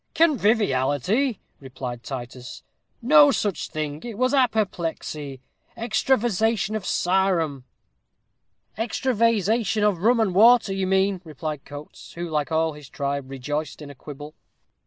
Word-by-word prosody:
"Conviviality!" 215 - +2 0.2
replied 130 -3 -7
Titus; 125 -1 -8 0.4
"no 295 +3 +7
such 205 - -1
thing 155 -1 -4
it 235 -4 -7
was 255 +2 +1
apoplexy 170 - -1 0.4
extravasation 225 -2 +1
of 210 -3 -4
sarum." 175 -7 +1 1.1
"Extra 240 +3 -1
vase 230 -4 +2
ation 220 -1 +1
of 205 -5 +2
rum 230 +6 +3
and 210 -5 +1
water, 225 +1 +5
you 195 -1 -1
mean," 190 0 +1
replied 155 -2 -6
Coates, 145 +1 -11
who, 175 +1 -5
like 155 -1 -2
all 160 0 +1
his 150 -2 -13
tribe, 140 -1 -3
rejoiced 145 +2 -4
in 145 -2 -9
a - - -10
quibble. 145 +3 -10
185 Hz, 130 wpm, -24 LUFS, 145-225 Hz, 1.1 s, no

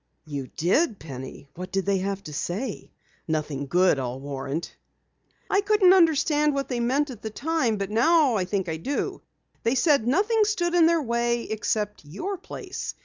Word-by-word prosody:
"You 140 -4 -5
did, 200 - +2
Penny? 135 -2 -9
What 185 +1 -7
did 195 -1 -1
they 195 -1 +2
have 195 +1 -3
to 150 - -8
say? 200 - -4 0.4
Nothing 150 -3 -2
good, 180 -1 +3
I'll 125 0 -4
warrant." 140 +3 -5 0.7
"I 395 - +2
couldn't 405 -2 +5
understand 300 -4 +3
what 275 0 -2
they 245 -2 -1
meant 265 +4 +1
at 235 - -10
the 220 - -4
time, 265 -2 0
but 200 0 -3
now 290 +4 +4
I 195 -4 0
think 190 0 -2
I 160 -1 -2
do. 275 - -3 0.4
They 230 +3 +1
said 280 +1 +4
that 225 - -6
nothing 420 - +3
stood 350 -5 0
in 340 -2 +6
their 335 -2 +2
way 235 -1 0
except 210 -2 -2
your 205 - -5
place. - - -6
225 Hz, 180 wpm, -25 LUFS, -, 0.7 s, in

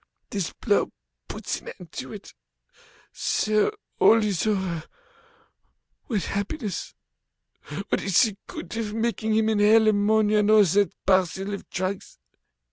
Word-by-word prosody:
This 195 -5 -2
blow - - 0 0.4
puts - - -4
an - - -8
end - - -12
to - - -7
it. - - -10 0.8
So 215 - +1 0.3
all 225 0 +6
is 205 -1 0
over, 190 -6 -1 1.2
what 210 -6 -1
happiness! 200 - -4 0.9
What - - +1
is 195 +2 +4
the 215 -4 0
good 175 - -7
of 215 -2 -3
making 220 -1 0
him 220 0 +2
inhale 220 +1 +5
ammonia 210 0 +3
and 210 0 +2
all 215 -1 +7
that 200 +2 +2
parcel 190 +1 +1
of 200 - -7
drugs? 185 +1 -4
205 Hz, 130 wpm, -25 LUFS, 195-220 Hz, 1.2 s, all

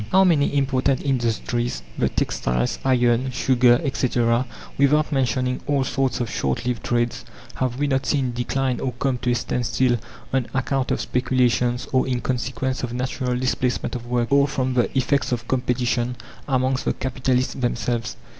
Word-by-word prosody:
How 190 +1 +6
many 150 -6 +3
important 135 -1 +1
industries 120 - -1
the - - +1
textiles, 60 0 -1
iron, 125 -1 +2
sugar, 125 -1 +4
etc. 125 -3 +1 0.3
without 150 +2 +3
mentioning 125 -1 0
all 140 -2 +2
sorts 130 -2 0
of 120 - -1
short 70 - -2
lived 125 -1 -2
trades, 120 0 0 0.3
have 125 -1 -1
we 145 - +1
not 135 -1 0
seen 130 -4 +1
decline 125 +1 -1
or 130 - -2
come 125 +1 -1
to 125 - -1
a 120 - +3
standstill 120 +1 +1 0.4
on 130 -3 +1
account 130 0 0
of - - 0
speculations, 125 0 +1
or 130 0 +2
in 125 -1 0
consequence 130 +1 -2
of 120 -1 -4
natural 125 0 -2
displacement 125 0 -1
of 120 -1 -6
work, 120 0 0
or 140 0 +5
from 130 -2 -1
the 120 -1 +2
effects 135 0 +1
of 120 -1 -2
competition 125 -1 0 0.3
amongst 130 -1 +1
the - - +1
capitalists 130 0 -1
themselves! 120 - -2
125 Hz, 160 wpm, -23 LUFS, 120-130 Hz, 0.4 s, How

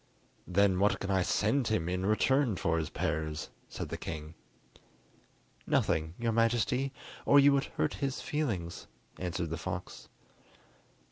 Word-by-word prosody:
"Then 95 0 +3
what 105 +2 +3
can 95 - -3
I 95 -1 +3
send 110 +8 +1
him 100 -7 0
in 90 +2 -1
return 125 +2 +3
for 80 -1 0
his 80 -1 -3
pears?" 80 -2 -2 0.2
said - - -5
the - - -5
king. 75 +1 -6 1.3
"Nothing, 80 +2 +1
your 115 -1 0
Majesty, 120 +4 +2 0.3
or 140 - +6
you 140 0 +6
would 135 -1 +2
hurt - - -1
his 140 0 -1
feelings," 105 - -3 0.3
answered 90 -2 -3
the 85 - -2
fox. 90 +1 -6
95 Hz, 140 wpm, -31 LUFS, 85-120 Hz, 1.3 s, or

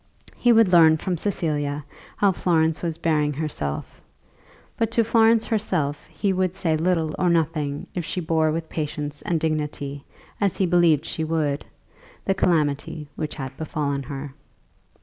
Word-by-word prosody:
He 240 - +3
would 225 -5 +5
learn 160 -2 +7
from 180 +3 -2
Cecilia 150 -6 -2 0.3
how 200 -1 +4
Florence 160 -3 +1
was 165 -2 -2
bearing 150 -3 +1
herself; 135 - -4 0.7
but 225 -1 0
to 230 0 +2
Florence 225 0 +4
herself 175 -10 -1
he 200 -2 -1
would 185 -1 0
say 170 -5 +1
little 160 -1 +1
or 180 - +3
nothing 155 -4 0
if 175 - -2
she 180 - -3
bore 160 -2 +1
with 160 +1 -3
patience 150 -2 -4
and 170 -2 0
dignity, 150 -3 -2 0.4
as 200 -3 +1
he 190 - +2
believed 170 -4 +3
she 160 - -3
would, 155 -3 -1 0.6
the 195 - +2
calamity 150 -4 0
which 155 - -4
had 135 -2 -6
befallen 145 -3 -2
her. 135 +1 -7
160 Hz, 150 wpm, -24 LUFS, 150-180 Hz, 0.7 s, learn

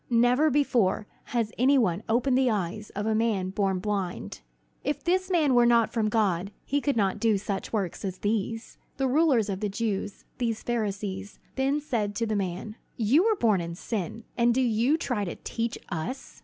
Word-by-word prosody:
Never 245 +5 +4
before 240 -9 +2 0.2
has 230 -3 -1
any 270 +3 +5
one 200 -7 +2
opened 250 +3 +2
the 260 -1 +3
eyes 210 0 -2
of 205 +1 -2
a 220 - +1
man 215 -4 0
born 195 -1 0
blind. 190 -2 -3 0.4
If 290 - -2
this 370 +2 +1
man 315 -7 +3
were 240 -1 +5
not 235 -1 +3
from 220 -2 +1
God, 200 -4 +1
he 285 +1 0
could 280 -4 0
not 195 -3 +1
do 225 -3 +3
such 195 0 -4
works 195 -6 -2
as 190 -2 -3
these!" 225 +3 -2 0.2
The 270 0 +1
rulers 265 -5 +3
of 195 -2 -3
the 210 0 -1
Jews, 205 -1 -3
these 230 -3 -1
Pharisees, 200 -4 -3 0.2
then 275 +2 +1
said 220 -8 -2
to 230 - 0
the 215 -1 -1
man: 195 +3 -3 0.2
"You 245 - +4
were 445 -1 +3
born 215 - +2
in 170 0 -5
sin, 215 +2 -4
and 235 0 +3
do 260 - +3
you 240 +5 +2
try 250 -10 -1
to 175 - -4
teach 230 0 -2
us?" 195 - -5
225 Hz, 190 wpm, -27 LUFS, 200-250 Hz, 0.4 s, any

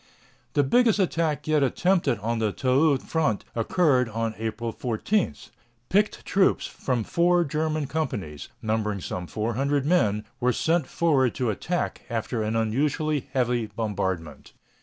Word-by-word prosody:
The 145 - +3
biggest 230 - +4
attack 165 -7 0
yet 155 -1 +3
attempted 145 - +2
on 115 +2 -1
the 110 -2 +1
Toul 135 +5 +3
front 150 -6 -1
occurred 125 0 +2
on 115 0 -2
April 115 +1 -3
14. 125 - -1 0.5
Picked 205 +3 +1
troops 195 0 +2
from 125 -4 -2
four 175 +6 +3
German 155 0 -1
companies, 100 - -4
numbering 110 -2 -1
some 90 0 -5
400 135 +8 -1
men, 110 - +2
were 125 0 +2
sent 165 0 +1
forward 140 -7 +2
to 125 -4 0
attack 175 - -2
after 115 0 -2
an 110 +1 -1
unusually 140 +6 0
heavy 120 -3 +1
bombardment. 95 -9 -4
130 Hz, 135 wpm, -25 LUFS, 110-155 Hz, 0.5 s, biggest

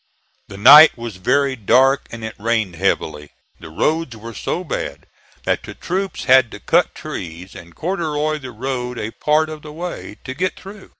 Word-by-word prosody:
The 100 - -10
night 145 +9 +9
was 115 -4 -7
very 140 +8 +1
dark 130 +5 +3
and 115 -1 -9
it 110 - -5
rained 110 -4 -1
heavily, 80 -5 -1 0.3
the - - -10
roads 150 - -1
were 115 +2 -9
so 175 - -3
bad 70 - -5 0.4
that - - 0
the - - -10
troops 190 +2 -3
had 130 -1 +5
to - - -8
cut - - +1
trees 85 +2 -7
and 85 0 -13
corduroy 155 -4 -2
the 130 -2 -8
road 125 +1 -4
a 110 0 -4
part 155 +4 +1
of 155 -1 -8
the 150 - -10
way, 165 -9 -7
to 130 - -6
get 180 +7 -2
through. 195 +1 -12
130 Hz, 180 wpm, -19 LUFS, 105-155 Hz, 0.4 s, night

